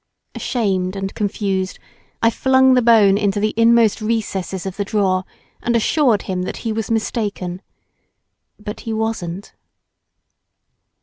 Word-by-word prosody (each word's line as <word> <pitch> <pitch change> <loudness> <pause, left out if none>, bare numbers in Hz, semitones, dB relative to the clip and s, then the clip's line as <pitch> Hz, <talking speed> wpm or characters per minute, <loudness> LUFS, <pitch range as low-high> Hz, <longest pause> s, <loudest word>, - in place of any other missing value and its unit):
Ashamed 190 -6 -1
and 195 0 -4
confused 195 -3 -2 0.5
I 230 - +5
flung 265 +1 +4
the 250 - +4
bone 215 -4 +5
into 205 -1 0
the 215 +1 0
inmost 230 -1 +4
recesses 200 -4 -2
of 190 -1 -4
the 200 - -2
drawer, 190 -3 0 0.4
and 235 - 0
assured 235 -1 +2
him 185 -1 -3
that 180 - -4
he 225 - 0
was 220 -1 -3
mistaken. 210 -5 -2 1.0
But 210 +1 -7
he 225 - -5
wasn't. 210 -4 -3
210 Hz, 130 wpm, -19 LUFS, 195-230 Hz, 1.0 s, I